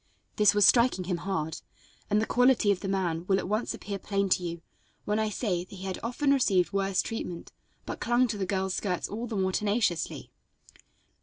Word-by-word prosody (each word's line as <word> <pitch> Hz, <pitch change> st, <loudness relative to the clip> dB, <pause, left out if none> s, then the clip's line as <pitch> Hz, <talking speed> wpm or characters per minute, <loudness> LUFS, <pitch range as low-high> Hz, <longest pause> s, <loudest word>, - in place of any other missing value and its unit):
This 210 Hz, -1 st, +5 dB
was 205 Hz, -2 st, +6 dB
striking 235 Hz, -5 st, +4 dB
him 180 Hz, -1 st, -2 dB
hard, 165 Hz, -3 st, -3 dB, 0.5 s
and 210 Hz, 0 st, +3 dB
the 220 Hz, -, +1 dB
quality 245 Hz, -4 st, +3 dB
of 195 Hz, -, 0 dB
the 195 Hz, -, -5 dB
man 180 Hz, -4 st, -1 dB
will 190 Hz, -, +3 dB
at -, -, -3 dB
once 215 Hz, +4 st, -1 dB
appear 200 Hz, -1 st, -6 dB
plain 200 Hz, 0 st, -1 dB
to 180 Hz, -, +3 dB
you 170 Hz, -1 st, -5 dB, 0.4 s
when 210 Hz, +1 st, 0 dB
I 220 Hz, 0 st, 0 dB
say 195 Hz, -5 st, -1 dB
that 185 Hz, -, -13 dB
he 190 Hz, -, -9 dB
had 190 Hz, -1 st, -4 dB
often 275 Hz, +5 st, +1 dB
received 195 Hz, -9 st, +2 dB
worse 195 Hz, -1 st, +1 dB
treatment, 180 Hz, -6 st, -6 dB, 0.3 s
but -, -, -5 dB
clung 240 Hz, +1 st, +2 dB
to 215 Hz, -, -2 dB
the 190 Hz, -, -2 dB
girl's 190 Hz, -1 st, -1 dB
skirts 180 Hz, -3 st, -2 dB
all 230 Hz, +4 st, -5 dB
the 225 Hz, -, -5 dB
more 190 Hz, -1 st, +1 dB
tenaciously. 205 Hz, -4 st, -1 dB
200 Hz, 205 wpm, -28 LUFS, 185-220 Hz, 0.5 s, was